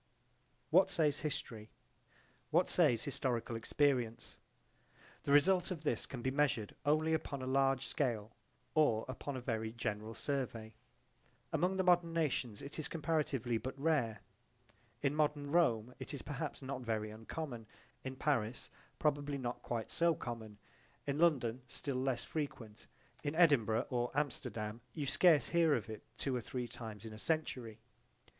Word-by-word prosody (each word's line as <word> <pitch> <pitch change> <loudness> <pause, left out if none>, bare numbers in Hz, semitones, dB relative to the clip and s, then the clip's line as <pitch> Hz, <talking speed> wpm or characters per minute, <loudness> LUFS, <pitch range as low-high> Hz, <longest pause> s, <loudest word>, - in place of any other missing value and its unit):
What 185 +4 +6
says 155 -6 +2
history? 125 -8 -4 0.8
What - - +4
says 115 -2 +3
historical 125 -5 -1
experience? 125 -1 0 0.9
The 140 - 0
result 180 +5 +5
of 170 -5 -4
this 120 -7 0
can 125 -3 -6
be 130 - +1
measured 135 -7 +1
only 155 +2 +3
upon 140 -4 -2
a - - -2
large 135 0 +2
scale 115 -6 -1 0.4
or 120 -8 +3
upon 130 +2 -4
a - - -5
very 110 -2 -2
general 110 -1 -3
survey. 115 -3 -3 0.8
Among 180 +4 +2
the 190 - +2
modern 175 -2 +4
nations 135 -8 -1
it 140 +3 -7
is 155 - 0
comparatively 140 -7 0
but 130 +4 -5
rare. 135 -9 +1 0.8
In 140 0 +2
modern 150 -1 +1
Rome 125 -8 +3
it 145 - -5
is 140 - -7
perhaps 145 -1 -4
not 130 -1 -4
very 110 -3 -2
uncommon; 115 +1 -6 0.4
in 130 0 -4
Paris 125 -5 -1 0.3
probably 145 -1 +1
not 125 -2 -4
quite 115 -2 -3
so 170 -1 +4
common; 110 -5 -6 0.5
in 140 +1 -1
London 130 -8 +3
still 135 +2 -3
less 130 -1 0
frequent; 120 -8 -5 0.4
in 145 +1 -2
Edinburgh 125 -10 +4
or 120 -1 +1
Amsterdam 115 -6 -2
you 150 - -2
scarce 160 +1 +5
hear 165 -3 +4
of 110 -2 -3
it 110 - -7 0.2
two 135 -2 -1
or 125 - -1
three 125 +1 -4
times 110 -2 -8
in 110 - -7
a 110 - -9
century. 125 -7 -1
130 Hz, 150 wpm, -36 LUFS, 115-150 Hz, 0.9 s, What